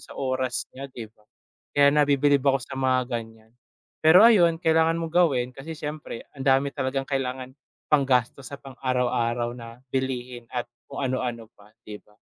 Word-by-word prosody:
sa - - -13
oras 130 -2 -2
niya, 135 +1 -8
di 120 -3 -8
ba? 105 - -31 0.6
Kaya 140 0 +6
nabibilib 145 -1 +3
ako 135 -2 +1
sa - - -9
mga 130 -1 +1
ganiyan. 115 -1 -7 0.5
Pero 175 +6 +7
ayun, 175 -8 +6
kailangan 160 0 +2
mong 165 -1 -4
gawin 140 -9 +3
kasi 150 +5 -8
siyempre 150 -5 -6
ang 135 -2 -8
dami 135 +1 +3
talagang 135 +1 -2
kailangan 130 -1 -3 0.4
panggastos 130 -2 +2
sa 140 - -7
pang 135 -1 -13
araw-araw 120 -2 0
na 120 +1 -11
bilihin 125 -2 -3
at 120 -1 -3 0.2
kung 140 0 -4
ano-ano 120 -3 -3
pa, 105 0 -21
di 105 -1 -9
ba? 105 - -27
130 Hz, 165 wpm, -25 LUFS, 120-140 Hz, 0.6 s, Pero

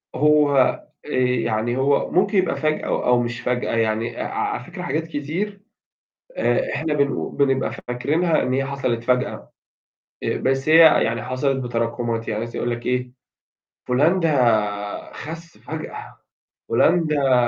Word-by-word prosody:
هو 150 -2 +4 0.5
آآ، - - -10
يعني 120 -1 0
هو 140 +1 +1
ممكن 195 +2 +2
يبقى 185 -2 +2
فجأة 155 0 -1
أو 125 0 +2
مش 120 0 -4
فجأة 125 -1 -1
يعني 115 0 -1
ع - - -1
ع - - -2
على - - -6
فكرة - - -9
حاجات 160 +2 -2
كتير 170 +7 -4 0.8
آآ، - - 0
إحنا 155 -2 -1
بنقو 140 -1 0
بنبقى 135 -1 +1 0.2
فاكرينها 155 +7 +1
إن 125 - -1
هي 135 +1 +1
حصلت 130 -4 -2
فجأة، 125 +1 -1 0.7
آآ، - - -1
بس 135 +3 0
هي 160 - +7 0.3
يعني 115 0 -1
حصلت 130 +1 -1
بتراكمات 115 -1 -2
يعني 105 0 -2
مثلًا 115 0 -6
يقول 120 - -1
لك 120 0 -5
إيه، 125 0 -1 0.8
فُلان 150 +9 +3
ده 110 - 0
خس 165 +2 -9
فجأة، - - -8 0.5
فُلان 175 -2 +3
ده 140 -3 +2
135 Hz, 150 wpm, -22 LUFS, 120-155 Hz, 0.8 s, هي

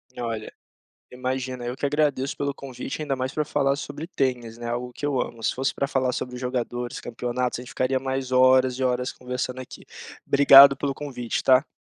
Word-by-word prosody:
Olha, 115 -3 -4 0.6
imagina, 130 0 -4
eu 125 +2 -4
que 140 - -1
agradeço 140 -2 0
pelo 140 -1 -2
convite, 135 +2 -7
ainda 140 -3 -2
mais 130 +1 -3
para 150 - -1
falar 140 -1 +1
sobre 150 +2 -6
tênis, 125 -8 -2
né, 120 0 -5
algo 125 +1 -3
que 145 - -4
eu 135 -3 0
amo. 115 -1 -5
Se - - 0
fosse 135 +1 -1
para 140 - -1
falar 130 -2 0
sobre 125 0 -4
jogadores, 125 -1 -3
campeonatos, 120 +1 -3
a - - -7
gente 125 - -11
ficaria 130 +1 0
mais 130 0 -3
horas 130 0 +5
e 130 - 0
horas 125 0 0
conversando 125 0 -4
aqui. 130 - -11 0.4
Obrigado 140 0 +8
pelo 140 0 -2
convite, 130 -5 -4
tá. 130 +2 +4
130 Hz, 195 wpm, -24 LUFS, 125-135 Hz, 0.6 s, Obrigado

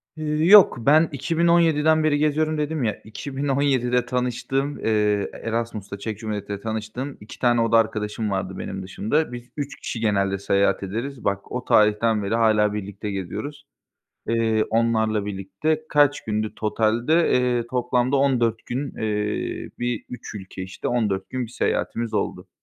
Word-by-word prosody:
Iıı, 155 0 -1
yok, 205 +1 +8
ben 150 +7 +4
2017'den 160 +1 +3
beri 150 -1 +3
geziyorum 155 +1 +1
dedim 150 -1 -1
ya, 110 -3 -2
2017'de 135 0 0
tanıştığım, 125 +3 -2
ııı, 105 -2 +1
Erasmus’ta, 115 -3 -4
Çek 110 -1 -5
Cumhuriyeti’nde 105 -2 -4
tanıştığım 110 +5 -5
2 105 - -12
tane 120 -2 +3
oda 115 0 +4
arkadaşım 110 -1 -1
vardı 95 -1 -3
benim 95 0 -5
dışımda. 110 +11 -1
Biz 120 0 -8
3 145 -1 -4
kişi 120 - -5
genelde 100 -3 +1
seyahat 100 0 +1
ederiz. 115 +6 -5
Bak, 100 0 -2
o 125 0 -4
tarihten 105 0 +3
beri 100 +3 0
hâlâ 110 -2 +3
birlikte 105 0 -5
geziyoruz, 105 +10 -5 0.6
eee, 115 -1 +2
onlarla 110 -2 +1
birlikte. 125 +11 -2
Kaç 145 -1 +3
gündü 110 0 -2
totalde? 115 +9 +1
Eee, 125 -2 +1
toplamda 125 +1 +1
14 120 -5 +1
gün, 135 +3 -4
eee, 105 -1 -2
bir, 120 -2 -2
3 125 -3 -8
ülke, 95 -1 -7
işte, 95 0 -5
14 105 -6 -1
gün 130 -1 -2
bir - - -14
seyahatimiz 115 -1 -1
oldu. - - -2
115 Hz, 145 wpm, -23 LUFS, 105-140 Hz, 0.6 s, yok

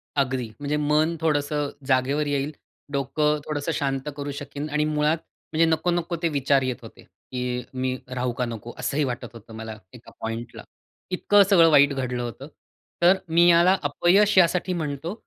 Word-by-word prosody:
अगदी, 130 -4 0
म्हणजे 145 +1 -1
मन 150 +3 +2
थोडंसं 145 -2 0 0.2
जागेवर 140 +3 +1
येईल, 140 +1 -1 0.4
डोकं 150 +2 0
थोडंसं 150 +1 -2
शांत 135 0 -2
करू 145 0 -4
शकीन. 145 +1 -6
आणि 150 +1 +1
मुळात 150 +1 +1 0.4
म्हणजे 165 +1 +4
नको-नको 170 +2 0
ते 165 - +3
विचार 140 -1 +2
येत 130 -1 -2
होते, - - -13
की 125 -1 -5
मी 130 0 -1
राहू 125 -1 -2
का 125 - +1
नको? 115 0 -7
असंही 145 +1 0
वाटत 120 -2 -4
होतं 115 0 -13
मला 110 -1 -7 0.2
एका 120 - -14
पॉइंटला. 115 +1 -5 0.5
इतकं 200 +2 +4
सगळं 170 -4 +6
वाईट 145 -1 +6
घडलं 125 -2 -3
होतं. 125 +4 -7 0.5
तर 180 +3 +6
मी 170 +2 +5
याला 175 +3 +5
अपयश 190 +8 +3
यासाठी 180 +1 +3
म्हणतो 155 +1 -3
145 Hz, 160 wpm, -24 LUFS, 130-160 Hz, 0.5 s, सगळं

